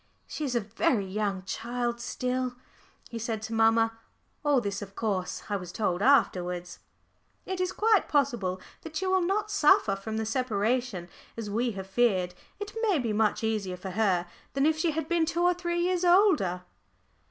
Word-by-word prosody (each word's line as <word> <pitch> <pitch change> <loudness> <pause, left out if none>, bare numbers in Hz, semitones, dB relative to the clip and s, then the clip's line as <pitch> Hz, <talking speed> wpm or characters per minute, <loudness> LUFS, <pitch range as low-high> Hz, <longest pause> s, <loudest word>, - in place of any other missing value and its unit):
"She 305 - -4
is 255 -3 -2
a - - +4
very 205 +1 0
young 195 -1 -2
child 235 +3 -3
still," 255 0 -2 0.6
he 230 - -4
said 225 -1 -2
to 220 +1 -5
mamma. 225 0 +3 0.4
(All 290 -3 +4
this 200 -3 -3
of 200 -1 -9
course 200 -5 -2
I 205 - -1
was 180 -2 -8
told 185 -2 -1
afterwards.) 180 -9 +2 0.7
"It 375 -1 -3
is 365 - 0
quite 435 -3 +3
possible 240 -11 +1 0.2
that 320 -1 -10
she 380 - -1
will 375 0 +3
not 415 +4 0
suffer 260 - +4
from 220 +3 -5
the 220 - -1
separation 225 -4 -1 0.3
as 215 -3 -4
we 235 +2 0
have 190 -1 -6
feared. 190 -4 +1 0.3
It 410 0 -6
may 420 -6 +3
be 235 -6 -1
much 215 +1 +1
easier 210 -5 -1
for 190 +1 -6
her 185 -3 +1 0.3
than 275 +1 +2
if 315 0 +3
she 340 - +2
had 315 -1 -2
been 335 -1 +2
two 340 +1 0
or 355 0 +5
three 345 -1 -2
years 360 0 +1
older." 350 - +4
230 Hz, 180 wpm, -28 LUFS, 200-310 Hz, 0.7 s, or